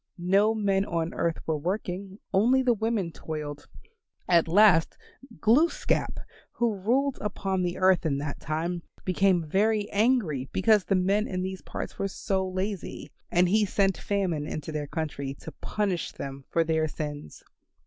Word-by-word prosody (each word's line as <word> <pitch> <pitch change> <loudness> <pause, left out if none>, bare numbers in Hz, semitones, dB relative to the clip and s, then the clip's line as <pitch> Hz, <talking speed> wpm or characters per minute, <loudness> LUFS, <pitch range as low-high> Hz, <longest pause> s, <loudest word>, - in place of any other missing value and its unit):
No 195 +5 +3
men 195 -2 +1
on 170 -3 -2
earth 165 -1 0
were 155 -2 -1
working; 190 +2 -3 0.2
only 245 +7 +4
the 245 -1 +4
women 220 -5 -1
toiled. 150 -2 -6 0.6
At 170 -2 +4
last, 180 -2 +5 0.4
Glooskap, 280 +10 +2 0.3
who 235 -2 +1
ruled 250 +8 0
upon 195 -2 -2
the 175 -1 -1
earth 185 -1 +4
in 150 -4 0
that 145 0 -4
time, 170 +3 -2 0.2
became 185 -2 +2
very 210 +4 +2
angry 200 - +1
because 210 0 +3
the 195 - +2
men 195 +3 +2
in 185 -1 -3
these 190 0 -4
parts - - -7
were 195 - 0
so 190 0 -2
lazy, 190 +1 -4 0.2
and 180 +1 +3
he 210 +4 +3
sent 195 -1 +2
Famine 180 -7 -1
into 155 +1 -5
their 150 -1 -3
country 140 -3 -4
to - - -10
punish 195 -5 -2
them 135 -1 -7
for 165 - +2
their 160 -1 +1
sins. 145 - -6
185 Hz, 155 wpm, -27 LUFS, 160-205 Hz, 0.6 s, last